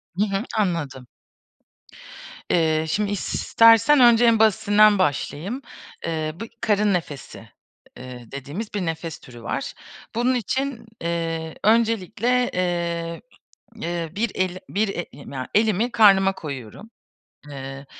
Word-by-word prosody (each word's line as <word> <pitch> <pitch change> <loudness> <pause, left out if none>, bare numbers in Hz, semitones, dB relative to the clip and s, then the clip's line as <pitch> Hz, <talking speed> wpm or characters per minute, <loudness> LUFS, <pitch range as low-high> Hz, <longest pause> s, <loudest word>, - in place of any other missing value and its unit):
Hı 195 - +2
hı. 200 +1 -2
Anladım. 155 - -2 1.4
Eee, 160 -2 +2
şimdi 205 +5 0
i - - -1
istersen 230 +7 +4
önce 240 -1 +6
en 230 -2 +4
basitinden 210 -1 +4
başlayayım. 185 - -1 0.4
Eee, 155 -2 -2
bu 225 - -4 0.2
karın 210 -3 +2
nefesi, 150 -6 -5 0.5
eee, 125 -1 -9
dediğimiz 145 - -6
bir 200 -3 -2
nefes 165 0 -4
türü 120 -2 -13
var. - - -3 0.4
Bunun 245 +2 +2
için, 260 +2 -2 0.2
eee, 165 -1 -3
öncelikle, 230 +2 +2
eee, 170 -2 -2 0.5
eee, 170 -6 -4
bir 225 +3 -1
el 185 -1 -1
bir 210 +2 0
e 175 -3 -3
i - - -15
ya, 130 -2 -5
elimi 220 +2 +2
karnıma 195 -4 +5
koyuyorum. 140 - -8 0.6
Eee, 135 0 -8
185 Hz, 125 wpm, -23 LUFS, 160-220 Hz, 1.4 s, önce